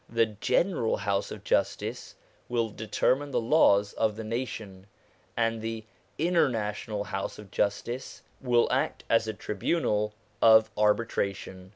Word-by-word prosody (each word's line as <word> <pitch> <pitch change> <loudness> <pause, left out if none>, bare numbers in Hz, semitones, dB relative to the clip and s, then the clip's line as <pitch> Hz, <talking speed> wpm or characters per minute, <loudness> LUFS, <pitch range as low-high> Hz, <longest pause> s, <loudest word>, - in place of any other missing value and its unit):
The 115 0 +3
General 115 - 0
House 100 -1 -1
of - - -8
Justice - - -1 0.3
will 115 -2 0
determine 130 +6 0
the - - 0
laws 105 -6 +4
of 110 -2 0
the 110 - -6
nation, 110 -4 -5 0.5
and 115 -1 0
the 115 0 -4 0.3
International 115 - 0
House 95 -1 -4
of 105 -3 -12
Justice 120 +7 -2 0.2
will 120 -2 +3
act - - 0
as 115 -1 +3
a 110 - -2
tribunal 105 - -1 0.3
of 110 -1 +6
arbitration. 100 -3 -1
110 Hz, 130 wpm, -28 LUFS, 105-120 Hz, 0.5 s, of